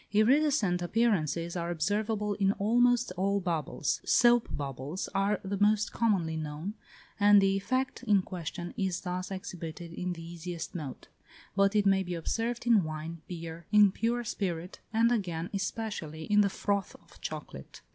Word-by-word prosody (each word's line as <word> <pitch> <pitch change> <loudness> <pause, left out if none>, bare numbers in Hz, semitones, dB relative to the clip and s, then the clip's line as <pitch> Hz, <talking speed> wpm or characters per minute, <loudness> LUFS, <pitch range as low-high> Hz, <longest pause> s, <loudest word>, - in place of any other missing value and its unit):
Iridescent 220 -4 +3
appearances 175 -5 +1
are 170 -1 -2
observable 205 +5 0
in 195 -1 +2
almost 240 +2 +3
all 200 +2 +1
bubbles; 165 -6 -1
soap 240 -1 +4
bubbles 140 +5 -4
are 200 +1 +1
the 195 0 -3
most 210 +1 +3
commonly 190 -9 +1
known, 155 +5 -4 0.5
and 205 0 +7
the 195 0 +3
effect 255 +7 -1
in 205 -6 +3
question 175 -1 -6
is 190 -3 -1
thus 180 0 -3
exhibited 175 -3 -6
in 180 +1 -3
the 165 -1 -9
easiest 170 0 -6
mode; 150 -7 -6 0.5
but 200 +1 +3
it 205 -1 +3
may 195 -1 +4
be 180 -1 -4
observed 230 +8 -2
in 230 -5 +5
wine, 155 +1 -5
beer, 165 -1 -7
in 210 -2 +7
pure 235 +4 -1
spirit, 185 -6 -3
and 230 +1 +3
again, 175 -7 -1
especially, 195 -6 -3
in 210 +4 +4
the 200 - +3
froth 200 0 -1
of - - -20
chocolate. - - -7
195 Hz, 155 wpm, -30 LUFS, 170-210 Hz, 0.5 s, and